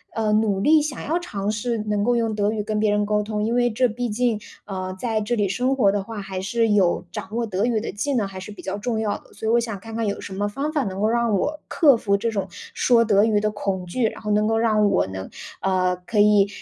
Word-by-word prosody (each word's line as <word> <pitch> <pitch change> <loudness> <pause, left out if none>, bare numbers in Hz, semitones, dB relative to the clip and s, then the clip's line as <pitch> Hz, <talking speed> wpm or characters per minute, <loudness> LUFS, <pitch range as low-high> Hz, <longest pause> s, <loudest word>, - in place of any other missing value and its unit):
呃， 220 -1 +1
努 210 -2 +2
力 305 +7 +5
想 295 -2 -4
要 330 +4 0
尝 210 - -3
试 230 +2 -2
能 210 -1 -1
够 245 0 +3
用 230 -2 0
德 205 0 +1
语 215 -1 -2
跟 215 0 -2
别 210 -1 +2
人 210 0 +1
沟 210 0 +1
通。 210 0 -3
因 225 +2 0
为 245 0 +3
这 240 +2 +1
毕 245 +3 -3
竟， 225 0 0 0.3
呃， 185 -2 -5
在 225 +1 -1
这 215 +3 -1
里 205 -4 +1
生 250 +7 +1
活 210 -7 +4
的 205 0 -1
话， 220 -1 -6
还 190 -1 -5
是 225 +4 0
有 195 -4 +2
掌 190 +4 -6
握 235 0 0
德 205 -1 -1
语 230 -3 +1
的 - - -4
技 245 +9 -2
能 215 -6 0
还 190 -1 -8
是 190 - -9
比 - - -11
较 190 +1 -4
重 220 +1 -2
要 210 -2 -1
的。 - - -21
所 220 +2 -3
以 - - +3
我 235 - +5
想 225 -3 -3
看 225 +4 -10
看 225 -1 -1
有 200 - -3
什 - - -8
么 205 +2 -1
方 275 +9 -3
法 295 -5 0
能 195 0 -4
够 215 - +3
让 235 -3 +2
我 305 +9 -2
克 285 -7 +5
服 200 -3 +1
这 225 +3 -1
种 195 -3 -2
说 230 +6 +1
德 210 -2 +4
语 215 -2 +2
的 215 0 0
恐 195 -3 -3
惧， 230 +7 -1
然 - - -7
后 210 -1 -2
能 210 +1 +2
够 225 0 +1
让 215 -2 +3
我 90 - +2
能， 95 0 -6 0.3
呃， 185 -1 +1
可 180 +4 -3
以 205 -1 +5
215 Hz, 295 characters per minute, -23 LUFS, 200-230 Hz, 0.3 s, 力